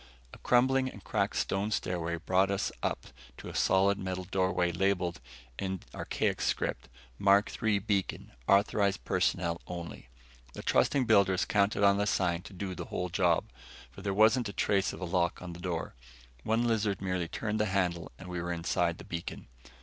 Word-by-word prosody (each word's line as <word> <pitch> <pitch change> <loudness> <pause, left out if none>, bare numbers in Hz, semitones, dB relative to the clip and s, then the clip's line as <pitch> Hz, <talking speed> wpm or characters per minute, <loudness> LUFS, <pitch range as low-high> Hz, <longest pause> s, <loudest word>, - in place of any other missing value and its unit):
A - - -12
crumbling 130 +2 +3
and 100 -6 -12
cracked - - -1
stone 100 +2 0
stairway 85 -5 -1
brought 95 +3 +2
us 100 -1 -1
up - - -2 0.3
to - - -8
a - - -9
solid 100 +1 +3
metal 95 -1 -3
doorway 95 -1 +1
labeled 90 -1 0 0.4
in 95 -1 -3
archaic - - -1
script - - -1 0.3
MARK 100 +1 +4
III 110 -2 +3
BEACON 100 -1 -2 0.2
AUTHORIZED 100 - +2
PERSONNEL 85 -1 0
ONLY. 85 -7 -7 0.4
The - - -8
trusting 135 -3 +2
builders 100 -5 +4
counted 100 0 +2
on 100 0 +5
the 105 +1 +1
sign 90 -3 +1
to 100 - -12
do 95 0 -4
the - - -6
whole 90 0 -3
job, 90 -2 +1 0.4
for - - -11
there 100 0 -1
wasn't 110 +3 +4
a - - -7
trace 100 -1 +1
of - - -9
a - - -2
lock 85 -1 0
on 90 -1 -7
the 85 - -10
door. 85 -2 -3 0.5
One 115 - +1
lizard 110 -4 +1
merely 90 -3 -2
turned 105 +5 -3
the 105 - +2
handle 90 -4 -1
and 95 - -10
we 90 -1 -4
were 90 0 -3
inside 85 0 0
the - - -10
beacon. 85 -8 -6
95 Hz, 180 wpm, -30 LUFS, 90-100 Hz, 0.5 s, on